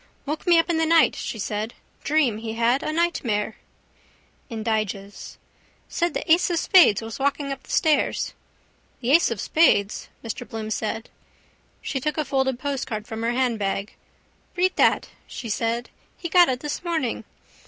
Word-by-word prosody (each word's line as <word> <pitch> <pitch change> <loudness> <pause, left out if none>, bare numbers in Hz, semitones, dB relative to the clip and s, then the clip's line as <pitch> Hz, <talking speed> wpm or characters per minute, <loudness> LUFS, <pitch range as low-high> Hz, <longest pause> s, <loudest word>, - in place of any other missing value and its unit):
—Woke 300 +5 -4
me 345 -1 +6
up 330 - +3
in 340 -2 0
the 325 - +3
night, 330 0 +5
she - - -5
said. 215 +2 -3 0.3
Dream 280 -8 +2
he 220 0 -5
had, 235 +3 +2
a - - -2
nightmare. 240 -11 -1 0.9
Indiges. 215 -3 -3 0.5
—Said 345 0 -1
the 325 - -2
ace 340 +3 +5
of 345 - 0
spades 320 - +5
was 225 +3 -7
walking 280 0 0
up 275 - -5
the - - -21
stairs. 310 -5 +1 0.7
—The 245 +1 0
ace 330 +4 +5
of 230 -4 -4
spades! 205 - +2
Mr 230 0 -6
Bloom 220 -1 -5
said. 220 +1 -3 0.7
She 270 - -2
took 300 +2 -2
a 305 - 0
folded 265 -2 0
postcard 255 -5 -3
from 220 0 -6
her 230 +1 0
handbag. 215 -6 -1 0.6
—Read 365 +1 +1
that, - - +3 0.2
she 235 - -7
said. 230 +3 -1 0.3
He 345 - -5
got 350 -2 +6
it 255 0 -2
this 295 +2 -4
morning. 325 -9 -2
255 Hz, 165 wpm, -24 LUFS, 220-315 Hz, 0.9 s, me